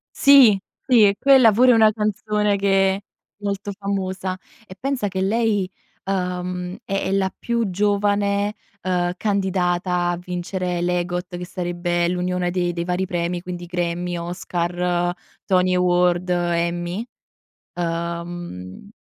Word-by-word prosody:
Sì, 260 -8 +7 0.2
qui 235 -5 +5
e, 200 - +2
quella 265 -5 +6
pure 250 +4 +5
è - - +6
una 220 -1 +6
canzone 210 -1 0
che 195 -1 +3
è - - -6 0.4
molto 200 0 -3
famosa 190 -2 -3 0.3
e 185 - -11
pensa 265 -6 -1
che 190 0 -3
lei, 205 -2 +1 0.4
uhm, 180 -1 -3
è 195 0 -2
è 190 - -1
la 190 -1 +1
più 235 -4 -1
giovane, 205 +1 +1 0.3
ehm, 180 -1 0
candidata 180 -3 0
a 175 - -1
vincere 180 0 -3
l'EGOT, 175 0 -2
che 180 - -5
sarebbe 175 -1 -1
l'unione 180 0 -1
dei 175 -1 0
dei 170 0 -2
vari 180 +1 -1
premi, 175 0 -2
quindi 175 -1 -6
Grammy, 175 0 -2
Oscar, 175 0 -2 0.3
Tony 185 -1 +2
Award, 180 0 +2
Emmy. 175 +3 -1 0.7
Uhm, 170 - -5
180 Hz, 130 wpm, -22 LUFS, 175-200 Hz, 0.7 s, Sì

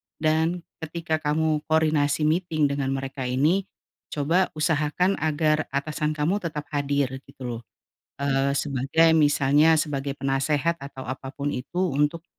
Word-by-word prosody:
dan 160 +2 +1 0.2
ketika 160 0 -3
kamu 155 0 +1
koordinasi 155 -2 +2
meeting 155 -2 +1
dengan 140 -1 -1
mereka 135 -1 -4
ini, 155 +10 +1 0.4
coba 165 +6 +1
usahakan 155 +4 +1
agar 155 0 +1
atasan 150 +2 -1
kamu 160 +7 +1
tetap 155 -5 -4
hadir, 140 -2 -1
gitu 135 -1 -12
loh. 120 -1 -4 0.6
Eee, 140 0 +1
sebagai 145 +4 +2
misalnya 150 +1 +4
sebagai 140 -2 -2
penasihat 140 +4 +1
atau 135 -1 -8
apa 130 +1 -5
pun 145 +1 -3
itu 175 +5 -2
untuk 150 +4 0
150 Hz, 130 wpm, -25 LUFS, 140-160 Hz, 0.6 s, misalnya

